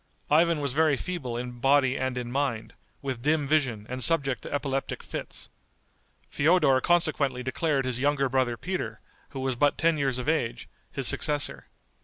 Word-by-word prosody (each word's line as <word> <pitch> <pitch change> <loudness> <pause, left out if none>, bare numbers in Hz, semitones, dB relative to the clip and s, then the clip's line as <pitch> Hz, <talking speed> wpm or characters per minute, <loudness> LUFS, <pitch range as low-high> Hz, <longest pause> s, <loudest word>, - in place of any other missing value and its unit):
Ivan 165 0 +4
was 140 -3 -1
very 155 -2 +3
feeble 130 -10 -4
in 120 0 -6
body 135 0 +3
and 130 -1 -2
in 120 -1 -4
mind, 130 -5 -2 0.3
with 130 -4 -3
dim 150 +2 +1
vision, 130 -8 +1
and 130 +1 -4
subject 140 -6 +1
to - - -9
epileptic 135 -1 -2
fits. - - -7 0.8
Feodor 145 -4 +3
consequently 145 -7 +1
declared 135 +2 0
his 125 -1 -1
younger 140 0 +2
brother 130 -2 0
Peter, 140 - -4 0.3
who 135 -2 -6
was 130 -1 -1
but 145 +3 +2
ten 165 -1 +2
years 135 -3 0
of 125 - -5
age, 120 -7 -1 0.2
his 135 -3 0
successor. 145 -1 +1
135 Hz, 165 wpm, -27 LUFS, 125-150 Hz, 0.8 s, Ivan